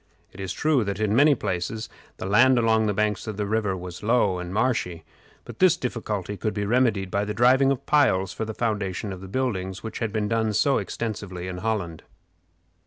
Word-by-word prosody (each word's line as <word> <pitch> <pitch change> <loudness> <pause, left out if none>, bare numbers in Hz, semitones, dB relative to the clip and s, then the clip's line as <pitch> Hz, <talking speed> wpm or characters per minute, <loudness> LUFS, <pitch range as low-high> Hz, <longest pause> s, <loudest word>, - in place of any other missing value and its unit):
It 95 - -13
is 95 -2 -4
true 145 - +2
that 100 0 -3
in 110 0 +1
many 145 +3 +6
places 105 +2 -3 0.3
the - - -6
land 125 +7 +5
along 110 -2 +3
the 105 - +1
banks 105 0 0
of 110 -2 -4
the 105 - -1
river 105 -2 0
was 90 0 -8
low 105 -5 +2
and 90 0 -6
marshy, 100 -7 -1 0.4
but - - -10
this 185 -2 +5
difficulty 105 - -4
could 110 0 -2
be 105 -1 -1
remedied 110 -5 +1
by 100 - +1
the 105 0 -4
driving 130 +3 +5
of 135 - -3
piles 95 -11 +2
for - - -4
the 110 -1 -5
foundation 105 -3 -2
of 95 - -9
the 95 - -8
buildings, 95 -5 -2
which 110 -1 -6
had 115 -2 -2
been 105 -1 -1
done 110 -1 0
so 135 +6 +3
extensively 100 -5 -5
in 90 -1 -5
Holland. 95 -6 -2
105 Hz, 205 wpm, -25 LUFS, 95-115 Hz, 0.4 s, many